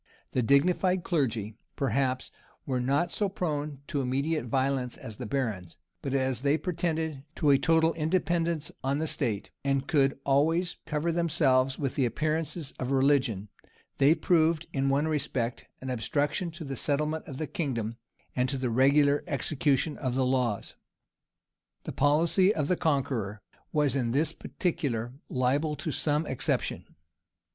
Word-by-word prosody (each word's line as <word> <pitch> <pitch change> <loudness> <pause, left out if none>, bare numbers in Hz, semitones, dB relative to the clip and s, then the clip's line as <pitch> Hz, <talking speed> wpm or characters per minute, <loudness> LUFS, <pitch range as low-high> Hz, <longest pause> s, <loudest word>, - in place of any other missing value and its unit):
The 130 - +1
dignified 175 - +3
clergy, 115 - -1 0.2
perhaps, 130 -1 0 0.3
were 130 -2 -1
not 140 +7 +1
so 205 -2 0
prone 150 -6 -3
to 140 - -2
immediate 140 +3 0
violence 130 0 0
as 110 -2 -8
the - - -5
barons; 105 -10 -3 0.2
but 135 0 -2
as 130 -2 0
they 145 +2 +3
pretended 160 -5 -2
to 150 - +3
a 135 - +5
total 165 -1 +3
independence 165 -1 0
on 135 +2 +1
the 160 - -1
state, 110 -9 -2
and 135 -1 +1
could 135 -4 +2
always 165 +6 +2
cover 155 +2 0
themselves 140 -6 +2
with 135 -3 -2
the 135 - +1
appearances 155 +4 -2
of 130 - -2
religion, 130 -7 +2 0.5
they 145 +4 +6
proved, 165 -1 +2
in 135 -1 +1
one 140 +3 +2
respect, 130 -6 -2
an 130 0 -4
obstruction 145 +8 -1
to 165 0 -8
the 135 -2 -4
settlement 150 +4 -1
of 135 - -7
the 155 - -2
kingdom, 115 -9 -3 0.4
and 125 0 +1
to 135 - -1
the 130 -2 -1
regular 140 +4 +4
execution 145 +1 0
of 130 -2 -2
the 130 -1 +2
laws. 125 -5 0 1.1
The - - -5
policy 165 +7 +3
of 150 -2 -1
the 180 - +3
Conqueror 125 - -1 0.3
was 145 -3 +2
in 120 -4 0
this 150 +4 +2
particular 120 -9 -2 0.2
liable 140 +4 +1
to 150 +2 -4
some 150 +2 0
exception. 130 -4 -2
140 Hz, 150 wpm, -28 LUFS, 130-160 Hz, 1.1 s, they